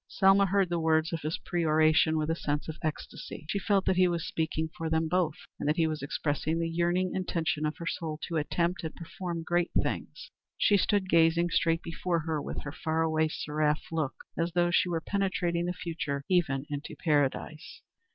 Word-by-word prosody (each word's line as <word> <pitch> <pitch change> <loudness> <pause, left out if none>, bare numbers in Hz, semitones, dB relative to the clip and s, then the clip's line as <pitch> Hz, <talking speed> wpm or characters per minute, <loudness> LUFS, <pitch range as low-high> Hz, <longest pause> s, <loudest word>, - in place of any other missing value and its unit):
Selma 195 0 +4
heard 195 0 +2
the 170 -1 0
words 160 0 +2
of 165 - -2
this 155 +2 -2
peroration 160 -1 +3
with 155 -1 0
a - - +1
sense 150 -2 -2
of 160 0 -6
ecstasy. 155 0 -5
She 200 - 0
felt 195 -1 +1
that 185 - +2
he 185 0 +5
was 170 -2 -1
speaking 160 0 -1
for 165 -1 -3
them 160 0 +1
both, 165 -2 +1 0.2
and - - -1
that 150 - +3
he 165 - +2
was 155 -1 -2
expressing 145 +2 -1
the 165 0 0
yearning 175 +2 +1
intention 160 -4 -1
of 150 - -4
her 170 - -7
soul 160 -2 -3
to 165 - -2
attempt 170 +4 0
and 160 - -5
perform 170 0 -5
great 175 +1 +1
things. - - -5 0.3
She 205 - +4
stood 200 0 +1
gazing 170 0 +4
straight 165 0 +2
before 170 0 -1
her 155 -1 -2
with - - -5
her 145 - -5
far 160 +2 -1
away, 160 0 +2
seraph 150 0 -1
look, 155 -4 -1 0.2
as 170 0 -1
though 175 0 +2
she 180 +1 +3
were 165 -2 -1
penetrating 175 -3 0
the 175 - -1
future 160 -6 -4
even 150 -7 +1
into 145 +1 -5
Paradise. 150 +1 -1
165 Hz, 200 wpm, -29 LUFS, 155-175 Hz, 0.3 s, he